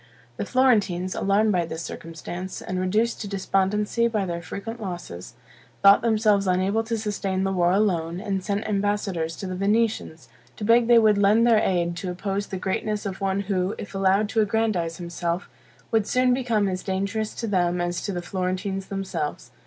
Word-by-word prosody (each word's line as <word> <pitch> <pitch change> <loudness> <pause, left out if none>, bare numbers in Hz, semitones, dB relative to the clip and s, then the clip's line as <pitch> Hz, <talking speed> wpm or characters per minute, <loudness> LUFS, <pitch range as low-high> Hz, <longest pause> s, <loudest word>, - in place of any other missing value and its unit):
The - - -3
Florentines, 205 -8 +2
alarmed 205 +2 +2
by 180 -3 +2
this 165 0 -5
circumstance, 170 +3 -7
and 185 0 -4
reduced 215 +6 0
to 205 - -4
despondency 200 +3 +1
by 215 -4 -1
their 170 -1 -4
frequent 225 +7 -7
losses, 175 - -7 0.5
thought 200 0 +8
themselves 215 -3 +2
unable 190 +4 +1
to 225 0 -1
sustain 200 -3 -2
the 195 - 0
war 175 -2 +2
alone, 180 -4 +1
and 195 -2 -2
sent 200 +2 -2
ambassadors 200 -5 -1
to - - -7
the 185 - -4
Venetians, 205 -4 0 0.3
to - - -6
beg 230 +2 +4
they 240 -1 +7
would 215 -2 +5
lend 210 +3 +4
their 230 -2 +5
aid 175 -3 0
to 185 - -4
oppose 195 +2 -3
the 190 - -4
greatness 205 +3 -2
of 195 0 -5
one 195 0 0
who, 190 -1 -1
if 205 - -8
allowed 195 +2 +2
to 220 - +2
aggrandize 205 -6 0
himself, 175 +1 -3 0.4
would 220 -3 +2
soon 250 0 +3
become 235 -5 +1
as 185 -1 -2
dangerous 200 +3 -2
to 230 - -4
them 180 -4 +1
as 175 0 -1
to 205 - -3
the 175 -2 -4
Florentines 190 +1 -3
themselves. 195 -6 -4
195 Hz, 180 wpm, -24 LUFS, 185-215 Hz, 0.5 s, thought